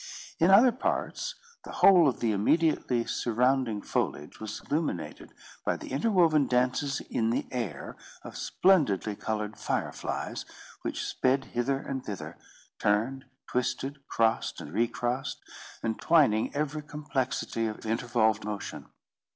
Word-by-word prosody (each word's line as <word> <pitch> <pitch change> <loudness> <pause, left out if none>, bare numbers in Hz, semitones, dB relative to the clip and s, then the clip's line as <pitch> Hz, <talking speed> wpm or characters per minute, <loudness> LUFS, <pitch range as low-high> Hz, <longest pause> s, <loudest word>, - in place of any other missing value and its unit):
In 170 - +5
other 225 +6 +8
parts, 260 - -2 0.3
the - - -9
whole 180 -5 +7
of 130 - -1
the 115 -2 +2
immediately 125 +2 +2
surrounding 120 -2 +1
foliage 75 - -2
was 110 -1 -5
illuminated 150 - -3 0.3
by - - 0
the - - -9
interwoven 160 - +3
dances 130 +3 +1
in 110 -1 -1
the 115 - 0
air 110 - -4 0.3
of - - -9
splendidly 120 - +2
coloured 105 0 -3
fire - - -1
flies, - - -4 0.4
which - - -3
sped 135 +1 +1
hither 130 +3 +1
and 135 -1 -5
thither, 100 -3 -6 0.4
turned, 115 +6 +1 0.2
twisted, 135 +3 -2
crossed, 115 -1 +1
and 75 - -9
recrossed, 120 +4 -1 0.5
entwining 115 0 +3
every 150 +1 -1
complexity 135 -6 -2
of 110 0 -6
intervolved 110 -1 +1
motion. 105 -1 -5
125 Hz, 125 wpm, -29 LUFS, 110-145 Hz, 0.5 s, other